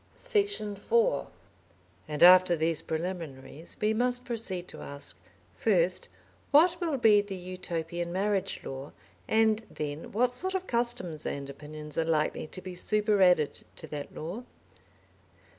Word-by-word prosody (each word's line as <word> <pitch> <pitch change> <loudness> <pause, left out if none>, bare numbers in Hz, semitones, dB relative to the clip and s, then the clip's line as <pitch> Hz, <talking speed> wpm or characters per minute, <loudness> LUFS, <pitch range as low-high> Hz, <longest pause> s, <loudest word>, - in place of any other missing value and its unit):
Section 410 - 0
4 470 - +1 0.8
And 150 0 0
after 180 0 +8
these 160 0 +1
preliminaries 160 -3 -5
we 215 +1 +2
must 245 +2 0
proceed 205 -7 -2
to - - -9
ask, 140 0 -5 0.4
first, - - +1 0.4
what 340 +4 +5
will 320 -5 0
be 215 -4 +6
the 205 -1 -6
Utopian 175 -2 -4
marriage 195 +1 -1
law, 135 +2 -7 0.3
and 220 0 +3
then 150 +1 -5
what 245 +3 +2
sort 375 +9 -2
of 375 0 -2
customs 235 - -1
and 140 0 -4
opinions 150 +2 -7
are - - +3
likely 155 -1 0
to 185 - -8
be 185 -1 -6
superadded 190 -5 +2
to - - -7
that 145 -1 -6
law? 180 +10 -5
185 Hz, 135 wpm, -29 LUFS, 160-235 Hz, 0.8 s, after